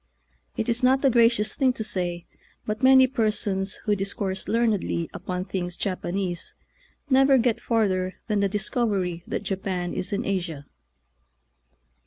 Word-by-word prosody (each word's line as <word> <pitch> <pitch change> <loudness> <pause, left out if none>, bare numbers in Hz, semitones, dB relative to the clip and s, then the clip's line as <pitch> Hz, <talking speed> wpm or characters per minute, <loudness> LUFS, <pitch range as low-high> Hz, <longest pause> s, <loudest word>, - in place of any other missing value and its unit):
It 220 - -1
is 235 +1 +2
not 265 +2 +3
a 270 - +5
gracious 230 -2 +3
thing 260 -2 +2
to 220 - -4
say, 175 -4 -3 0.4
but 215 +2 -3
many 260 0 +7
persons 210 -6 -1
who 210 - +2
discourse 195 -1 -2
learnedly 220 -7 0
upon 180 0 -4
things 180 -2 -3
Japanese 185 -1 -3 0.6
never 270 +1 +6
get 240 -2 +1
farther 190 -5 0
than 210 -2 0
the' 200 -1 +2
discovery 195 -4 -1
that - - -3
Japan 190 -2 -3
is 185 - -4
in 200 - -2
Asia. 170 -7 -3
200 Hz, 140 wpm, -25 LUFS, 185-230 Hz, 0.6 s, many